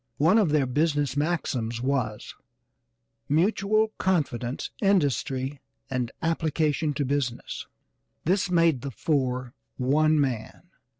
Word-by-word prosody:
One 170 +9 +5
of 200 -7 +3
their 150 -2 +3
business 145 0 0
maxims 135 -7 -1
was, 125 -5 -2 1.0
"Mutual 200 +7 +2
confidence, 140 -9 -1
industry 140 -7 +1 0.3
and 125 -2 -1
application 155 -2 0
to 145 0 0
business." 130 -3 -2 0.6
This 185 +3 +2
made 165 -7 +3
the 140 - -4
four 130 -3 -1 0.2
one 155 +4 +3
man. 130 -1 -2
145 Hz, 105 wpm, -26 LUFS, 130-165 Hz, 1.0 s, One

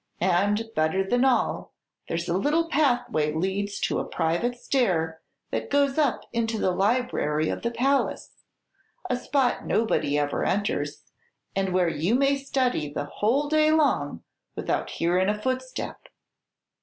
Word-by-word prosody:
And, 205 +5 +1
better 160 +4 +2
than 245 +6 +1
all, 260 -2 +1 0.3
there's 170 +1 -2
a 170 - 0
little 305 - +1
pathway 245 - +1
leads 195 +4 -2
to - - 0
a - - -1
private 175 +10 -1
stair 170 - 0 0.3
that - - -3
goes 280 0 +2
up 285 -5 +2
into 225 -1 0
the 190 - +1
library 195 -7 +1
of - - -3
the 235 - 0
palace, 270 +4 0 0.8
a - - +2
spot 255 +1 0
nobody 215 -10 +1
ever 145 -1 0
enters, 170 -8 -1 0.5
and 195 -1 0
where 180 -1 +2
you 165 +7 +1
may 275 +1 +3
study 255 - -1
the 145 0 -3
whole 235 - 0
day 310 +1 +3
long 270 - +1 0.3
without - - -2
hearin' 180 +3 +1
a 210 0 -1
footstep. 255 +2 -3
210 Hz, 145 wpm, -26 LUFS, 170-260 Hz, 0.8 s, may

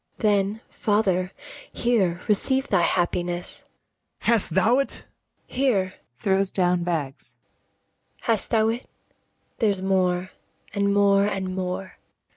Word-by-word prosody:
Then, 205 0 +1
father, 190 -4 0 0.4
here 190 -8 +1
receive 265 +6 +1
thy 190 -3 +3
happiness. 175 0 -1 0.6
BARABAS. - - -13
Hast 230 -3 +5
thou't? 235 +9 +3
ABIGAIL. - - -7 0.5
Here.[throws 195 - 0
down 180 -2 +1
bags] 155 -6 -4 0.9
Hast 225 -3 0
thou't? 225 +1 +2 0.8
There's 200 -5 +1
more, 185 -1 +1 0.4
and 200 -1 +1
more, 200 0 +4
and 190 -2 -3
more. 185 0 -4
195 Hz, 100 wpm, -24 LUFS, 180-215 Hz, 0.9 s, Hast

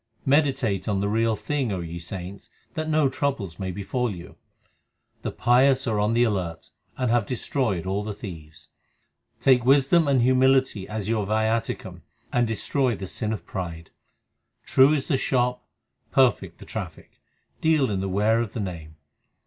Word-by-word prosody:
Meditate 135 -9 +1
on 100 -2 0
the 100 - 0
Real 110 +1 +1
Thing, 135 -1 -2
O 95 - -2
ye 85 0 -6
saints, 90 +3 -7 0.2
that 155 +2 -3
no 155 -2 +3
troubles 130 - -2
may 95 -1 -3
befall 105 +7 -2
you. 90 -4 -9 0.9
The - - -3
pious 130 +2 +3
are 110 -4 0
on 105 +2 +1
the 120 - +4
alert, 95 -7 -2 0.3
and 125 -3 0
have 120 -4 +2
destroyed 120 - -1
all 95 +2 -1
the 105 -1 -5
thieves. 80 -7 -10 0.7
1 - - -38
Take 130 -3 +5
wisdom 140 +5 +4
and 135 -4 +3
humility 130 -5 +3
as 105 -2 -4
your 110 -3 0
viaticum, 110 +2 -1 0.3
and 120 -1 +2
destroy 125 +2 0
the 95 - -6
sin 105 +3 -3
of 110 - -5
pride. 85 -3 -6 0.7
True 135 +2 +5
is 145 -3 0
the 135 -5 +1
shop, 125 -1 0 0.5
2 - - -33
perfect 130 -5 +2
the - - -12
traffic; - - -8 0.4
deal 155 -7 +3
in 100 - -1
the 95 0 -2
ware 105 +4 +2
of 115 -4 -4
the - - -4
Name. 85 -6 -6
115 Hz, 170 wpm, -25 LUFS, 95-130 Hz, 0.9 s, Take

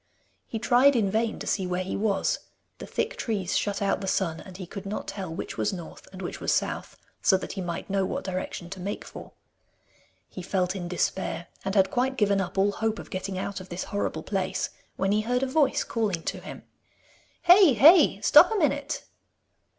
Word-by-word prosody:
He 225 - -4
tried 255 +5 +4
in 205 -5 +2
vain 225 +1 0
to - - -7
see 190 -2 0
where 180 +1 -1
he 185 - -4
was: 200 -2 0 0.4
the - - -8
thick 465 +2 -2
trees 200 -6 -2
shut 200 0 0
out 200 - +1
the 195 - -4
sun, 170 -4 0
and 185 -1 -11
he 190 - -6
could 195 +3 -8
not 205 - -4
tell 190 -4 -5
which 165 - -6
was 205 - +1
north 175 -4 -9
and 190 0 -8
which 175 - -6
was - - 0
south, - - -2 0.2
so 190 - +4
that - - -6
he 195 - -5
might 170 -2 -4
know 195 0 0
what - - -3
direction 185 -2 -4
to 195 - -6
make 200 +3 -4
for. - - -10 0.9
He 185 - -8
felt 185 +1 -1
in 175 -2 -4
despair, 175 -1 -2
and 195 +1 -2
had 190 -1 +4
quite 260 +1 0
given 200 -3 +2
up 190 - -5
all 200 +1 +3
hope 220 +1 -1
of - - -10
getting 190 0 -4
out 195 +1 -3
of 185 - -12
this 175 +1 -4
horrible 205 - -2
place, 190 -2 -2 0.2
when 195 +1 0
he 210 +1 +2
heard 250 +4 0
a - - +3
voice 280 +2 +2
calling 205 -8 -2
to - - -3
him. - - -9 0.8
'Hey! 355 -5 +7
hey! 315 - +7
stop - - +7
a - - 0
minute! 285 -3 0
195 Hz, 210 wpm, -27 LUFS, 185-225 Hz, 0.9 s, Hey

